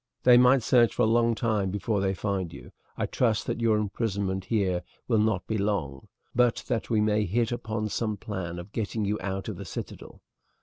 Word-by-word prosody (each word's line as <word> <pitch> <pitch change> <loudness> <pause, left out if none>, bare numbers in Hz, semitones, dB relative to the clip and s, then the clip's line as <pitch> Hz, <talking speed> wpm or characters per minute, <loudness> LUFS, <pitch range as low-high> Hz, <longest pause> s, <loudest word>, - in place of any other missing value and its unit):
They 125 -1 +7
might 125 +1 +5
search 120 -1 +4
for 120 - +2
a - - +5
long 115 +1 +3
time 110 -5 0
before 105 +1 -1
they 95 0 0
find 95 -3 -2
you. - - -11 0.3
I - - 0
trust 110 -3 0
that - - -3
your 110 -2 +3
imprisonment 100 -2 -2
here 95 -4 0 0.3
will 115 -3 +3
not 105 -4 +1
be 110 -1 -2
long, 85 -10 -2 0.3
but 125 -1 +2
that 115 - -2
we 110 - +2
may 105 0 +2
hit 115 +5 0
upon 110 -2 -3
some 110 -1 -2
plan 95 -4 -5
of 85 +4 -9
getting 110 0 -2
you 105 +2 -1
out 95 0 -3
of - - -5
the - - -6
citadel. - - -8
105 Hz, 205 wpm, -27 LUFS, 95-115 Hz, 0.3 s, They